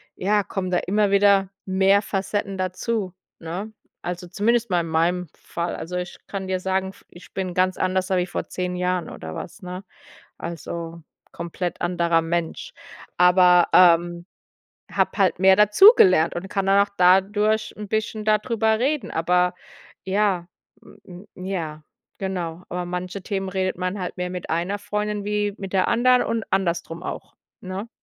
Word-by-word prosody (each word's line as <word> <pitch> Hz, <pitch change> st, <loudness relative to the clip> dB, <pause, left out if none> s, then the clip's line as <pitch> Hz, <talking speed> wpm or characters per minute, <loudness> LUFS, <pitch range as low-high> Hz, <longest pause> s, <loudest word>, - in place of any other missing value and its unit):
ja, 205 Hz, +2 st, +1 dB
kommen 185 Hz, -2 st, -4 dB
da 180 Hz, -, +2 dB
immer 205 Hz, +1 st, +1 dB
wieder 200 Hz, -1 st, +4 dB, 0.2 s
mehr 195 Hz, +1 st, +3 dB
Facetten 200 Hz, 0 st, -3 dB
dazu, 185 Hz, +1 st, -2 dB, 0.2 s
ne? 180 Hz, +6 st, -6 dB, 0.3 s
Also 175 Hz, 0 st, -5 dB
zumindest 220 Hz, +4 st, 0 dB
mal 175 Hz, -, +3 dB
in 165 Hz, -, -5 dB
meinem 170 Hz, +2 st, 0 dB
Fall. 170 Hz, 0 st, -4 dB
Also, 180 Hz, +2 st, -5 dB
ich 180 Hz, 0 st, -5 dB
kann 195 Hz, -1 st, -5 dB
dir 185 Hz, -1 st, -1 dB
sagen, 190 Hz, 0 st, -1 dB
f 195 Hz, -, -16 dB
ich 175 Hz, -, -15 dB
bin 185 Hz, -2 st, -3 dB
ganz 185 Hz, 0 st, +1 dB
anders 185 Hz, +1 st, 0 dB
als 190 Hz, -, +2 dB
wie -, -, -1 dB
vor -, -, -4 dB
10 180 Hz, 0 st, -3 dB
Jahren 180 Hz, 0 st, -1 dB
oder 80 Hz, 0 st, -8 dB
was, 215 Hz, -, -8 dB
ne? 180 Hz, +1 st, -7 dB, 0.5 s
Also 170 Hz, 0 st, -6 dB, 0.3 s
komplett 170 Hz, +1 st, -5 dB
anderer 170 Hz, -1 st, +1 dB
Mensch, 165 Hz, 0 st, -3 dB, 0.4 s
aber, 180 Hz, 0 st, +5 dB
ähm, 175 Hz, 0 st, +5 dB, 0.6 s
habe -, -, +1 dB
halt 195 Hz, -5 st, +2 dB
mehr 190 Hz, +1 st, +6 dB
dazugelernt 210 Hz, -, +6 dB
und 190 Hz, +2 st, -5 dB
kann 195 Hz, -2 st, -1 dB
dann 200 Hz, +1 st, +5 dB
auch -, -, -25 dB
dadurch 205 Hz, +4 st, +3 dB
'n 210 Hz, -1 st, -7 dB
bisschen 220 Hz, 0 st, -2 dB
da 215 Hz, 0 st, +5 dB
drüber 220 Hz, 0 st, 0 dB
reden. 275 Hz, +3 st, -1 dB
Aber 180 Hz, +2 st, +1 dB, 0.5 s
ja, 190 Hz, -3 st, 0 dB, 0.4 s
m 180 Hz, +2 st, -14 dB
m 185 Hz, -, -9 dB
ja, 160 Hz, -5 st, -4 dB, 0.4 s
genau. 180 Hz, -3 st, -4 dB
Über 180 Hz, 0 st, -3 dB
manche 180 Hz, +2 st, -5 dB
Themen 195 Hz, -1 st, -3 dB
redet 185 Hz, -1 st, -2 dB
man 185 Hz, +2 st, -2 dB
halt 180 Hz, 0 st, -5 dB
mehr 180 Hz, -, -2 dB
mit 180 Hz, -1 st, -6 dB
einer 175 Hz, +5 st, -1 dB
Freundin 210 Hz, 0 st, -3 dB
wie 205 Hz, -1 st, -1 dB
mit 195 Hz, -3 st, -7 dB
der 190 Hz, -2 st, +2 dB
anderen 250 Hz, +2 st, +4 dB
und 230 Hz, -2 st, -2 dB
andersrum 170 Hz, -2 st, -1 dB
auch, -, -, -7 dB, 0.3 s
ne? 190 Hz, +4 st, -6 dB
185 Hz, 165 wpm, -23 LUFS, 175-205 Hz, 0.6 s, mehr